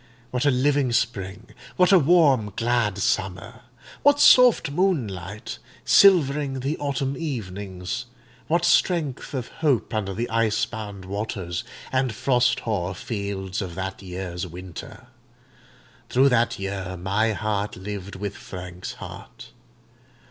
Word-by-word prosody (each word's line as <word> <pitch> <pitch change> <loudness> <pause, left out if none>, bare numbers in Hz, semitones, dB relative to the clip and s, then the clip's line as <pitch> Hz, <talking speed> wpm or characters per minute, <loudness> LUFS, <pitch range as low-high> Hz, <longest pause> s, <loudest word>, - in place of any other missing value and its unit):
What 125 +2 -1
a - - +7
living 140 0 +2
spring—what 115 - -1
a 190 - +8
warm, 140 - +4
glad 115 -4 +1
summer—what 100 - -1
soft 245 - +6
moonlight, 110 - -2 0.3
silvering 145 -8 +5
the 140 +4 -1
autumn 140 -1 -1
evenings—what 120 - -4
strength 170 -6 +1
of 125 -3 -4
hope 145 -9 +1
under 100 -3 -2
the 120 +2 -2
ice 115 -2 +2
bound 105 -4 -7
waters 95 -3 -4 0.3
and 130 -4 0
frost 125 0 +2
hoar 95 -5 -2
fields 100 -2 -4
of 90 -4 -5
that 95 +1 -4
year's 90 -1 -5
winter! 90 0 -9 1.0
Through 135 +2 +4
that 120 -2 +2
year 95 -1 -4
my 100 +5 +1
heart 105 -1 -2
lived 100 0 -6
with 100 +1 -4
Frank's 90 -1 -8
heart. - - -10
110 Hz, 115 wpm, -24 LUFS, 95-135 Hz, 1.0 s, a